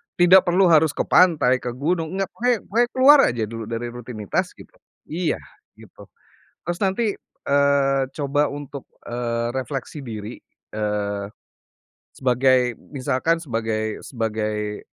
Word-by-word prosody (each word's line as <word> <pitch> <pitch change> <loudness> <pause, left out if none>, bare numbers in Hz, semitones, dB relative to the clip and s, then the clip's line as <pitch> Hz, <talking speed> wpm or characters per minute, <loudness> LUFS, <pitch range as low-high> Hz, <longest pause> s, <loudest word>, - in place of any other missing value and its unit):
tidak 180 +1 +6
perlu 180 +1 +4
harus 155 -1 +4
ke - - 0
pantai, 155 -8 +4
ke 125 - -5
gunung, 160 +5 -2
nggak, 195 -1 -1
pokonya 245 0 +1
pokoknya 235 +3 +2
keluar 275 +3 +7
aja 120 -2 -2
dulu 115 -1 -6
dari 115 +1 -4
rutinitas 120 -4 -4
gitu. - - -15 0.4
Iya 165 0 -1 0.4
gitu, - - -16 0.6
terus 175 +1 -3
nanti, 205 +2 +1 0.3
eee, 140 -1 +2
coba 145 0 +1
untuk, 145 -1 -8 0.2
eee, 120 -1 -2
refleksi 135 +3 -5
diri, 110 -3 -7 0.3
eee, 105 -1 -2 0.9
sebagai 125 -1 +2 0.2
misalkan 140 +5 0
sebagai 110 -4 -2
sebagai, 105 -3 -3
135 Hz, 125 wpm, -22 LUFS, 115-165 Hz, 0.9 s, keluar